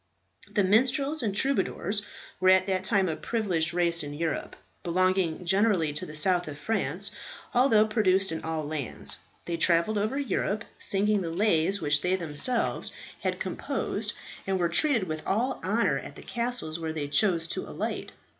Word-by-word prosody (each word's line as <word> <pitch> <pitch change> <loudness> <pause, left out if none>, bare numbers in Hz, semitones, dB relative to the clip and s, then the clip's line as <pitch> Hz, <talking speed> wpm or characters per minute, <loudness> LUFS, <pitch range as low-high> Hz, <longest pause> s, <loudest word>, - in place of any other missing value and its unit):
The 205 - +2
minstrels 265 +9 +2
and 205 -4 -2
troubadours 205 -5 0 0.4
were 185 0 +4
at 185 0 +5
that 190 -1 -1
time 195 -1 +2
a 160 - -1
privileged 175 -4 -1
race 170 -1 +2
in 145 0 -6
Europe, 160 -1 -3 0.3
belonging 185 -1 0
generally 190 -4 +2
to 150 - -2
the 155 - -9
south 180 +2 +2
of 145 -2 -7
France, 190 +1 0 0.4
although 240 -4 +4
produced 195 -4 +2
in 160 - -4
all 160 -1 -3
lands. 145 -4 -4 0.3
They 170 -1 -3
travelled 170 +5 +3
over 215 +7 -1
Europe 215 -5 -1
singing 205 +1 +2
the 170 - -3
lays 190 +1 +1
which 145 0 +1
they 180 +1 +1
themselves 180 - +3 0.3
had - - -2
composed, - - -3 0.3
and 190 -1 0
were 170 -1 +1
treated 235 - +3
with 155 -3 -4
all 245 +6 -1
honour 190 -8 +1
at 140 - -10
the - - -12
castles 235 -7 -1
where 160 -1 -4
they 150 -2 -3
chose 165 +2 +2
to - - -4
alight. - - -4
185 Hz, 165 wpm, -27 LUFS, 165-215 Hz, 0.4 s, at